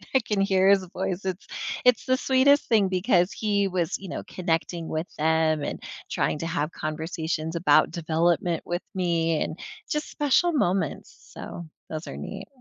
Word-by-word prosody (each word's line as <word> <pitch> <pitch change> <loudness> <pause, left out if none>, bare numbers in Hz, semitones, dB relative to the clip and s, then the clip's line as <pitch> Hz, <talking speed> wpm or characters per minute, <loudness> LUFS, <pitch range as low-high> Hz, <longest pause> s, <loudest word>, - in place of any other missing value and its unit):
I 260 - +6
can 210 -3 -2
hear 190 -1 +4
his 195 -1 +4
voice, 185 +1 -3
it's 185 0 -3 0.4
it's 250 -2 +4
the 255 - +3
sweetest 270 +2 +4
thing 210 -4 +4
because 185 -1 +2
he 205 -2 +1
was, 180 -3 -1
you 195 - -9
know, - - -5
connecting 165 -1 -2
with 160 +3 -3
them 160 0 +2
and - - -4 0.3
trying - - 0
to 165 - -3
have 165 -2 -1
conversations 160 +1 -3
about 170 - +4
development 170 +1 +1
with 175 +1 -2
me, 165 -3 +1
and 160 - -6 0.3
just 300 0 -2
special 295 +4 +2
moments, 185 - -1 0.2
so 170 - -8 0.2
those 155 +1 -5
are - - -6
neat. - - -7
175 Hz, 165 wpm, -26 LUFS, 165-200 Hz, 0.4 s, I